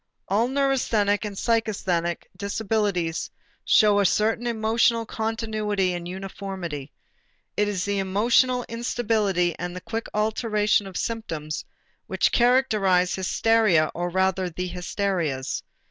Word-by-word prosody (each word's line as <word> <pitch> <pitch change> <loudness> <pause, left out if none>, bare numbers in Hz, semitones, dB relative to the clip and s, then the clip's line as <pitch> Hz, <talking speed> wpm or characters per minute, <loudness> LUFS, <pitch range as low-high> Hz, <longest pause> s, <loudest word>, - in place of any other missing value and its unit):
All 215 +5 +2
neurasthenic 250 -7 +1
and 205 -1 -5
psychasthenic 195 -7 0
disabilities 200 -5 -1 0.3
show 210 -1 +5
a 200 - +3
certain 225 +4 +1
emotional 230 0 +2
continuity 215 -4 -1
and 175 -1 -5
uniformity. 185 -5 -6 0.6
It 210 - +2
is 190 -3 -2
the 200 0 0
emotional 235 +6 +2
instability 215 -7 0
and 180 0 -4
the 180 - -6
quick 225 +3 -4
alternation 210 -1 +1
of 190 - -6
symptoms 165 -10 -4 0.4
which - - +1
characterize 215 -8 +3
hysteria 190 -4 +2
or 175 +1 -2
rather 190 0 +1
the 180 +2 -4
hysterias. 175 -6 -2
205 Hz, 115 wpm, -25 LUFS, 180-225 Hz, 0.6 s, show